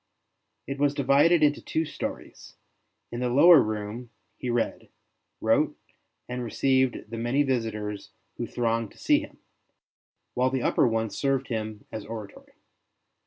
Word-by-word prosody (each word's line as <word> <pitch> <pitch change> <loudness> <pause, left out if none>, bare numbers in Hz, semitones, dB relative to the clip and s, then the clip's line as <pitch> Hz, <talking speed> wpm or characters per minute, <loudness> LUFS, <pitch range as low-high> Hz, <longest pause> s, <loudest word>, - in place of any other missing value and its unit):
It 140 0 -5
was 145 0 +2
divided 145 +4 +4
into 150 0 +3
two 160 - -1
stories: 150 - -7 0.6
in 120 - -4
the 125 0 0
lower 165 +7 +8
room 110 +3 -4 0.3
he 125 - -5
read, 120 -1 -1 0.5
wrote, - - +2 0.5
and 125 0 -4
received 130 -1 0
the 115 - -4
many 120 +5 +1
visitors 110 -6 -3 0.3
who - - -3
thronged 115 -2 -1
to - - -22
see - - +3
him; - - -10 1.0
while 125 +1 +2
the 130 -1 -2
upper - - +3
one 115 -2 -1
served 135 +4 -1
him 110 -2 -4
as 110 -2 -5
oratory. 110 -2 -9
120 Hz, 140 wpm, -27 LUFS, 110-135 Hz, 1.0 s, lower